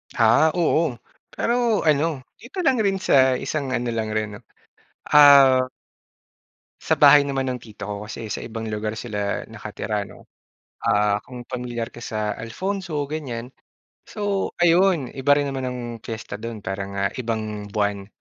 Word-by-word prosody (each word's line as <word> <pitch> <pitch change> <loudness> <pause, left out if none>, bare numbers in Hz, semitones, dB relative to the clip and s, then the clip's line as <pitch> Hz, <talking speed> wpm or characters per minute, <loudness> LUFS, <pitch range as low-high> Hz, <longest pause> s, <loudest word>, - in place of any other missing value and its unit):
Ah, 120 +6 +5
oo 160 -6 +1 0.3
pero 235 -3 +1
ano 150 -1 +1 0.2
dito 260 +10 -9
lang 270 -7 +3
rin 195 -1 +1
sa 130 -6 +4
isang 140 -4 -3
ano 120 -1 -1
lang 110 -2 -2
rin 105 -1 -2
no - - -16 0.7
ah 140 -3 +8 1.2
Sa - - +1
bahay 145 0 +8
naman 135 -1 -1
ng 125 -1 -3
tito 105 -3 -9
ko 105 +1 -5
kasi 110 0 -7
sa - - -3
ibang 115 -1 -6
lugar 105 0 -3
sila 105 -4 -3
nakatira 105 -1 -4
no. - - -15 0.6
Ah, 105 -2 +2
kung 125 -1 -10
pamilyar 120 -2 -4
ka 120 - -12
sa 105 -2 -2
Alfonso 165 - -3
ganyan. 130 -6 -5 0.6
So, 205 -2 -2
ayun 175 -4 +3
iba 135 +1 +1
rin 145 -1 0
naman 135 -1 -3
ang 125 0 -4 0.2
fiesta 110 -1 -6
dun 115 0 -6
para 95 0 -3
nga 100 0 -3
ibang 110 -4 -4
buwan. 100 -2 -1
125 Hz, 150 wpm, -23 LUFS, 110-150 Hz, 1.2 s, ah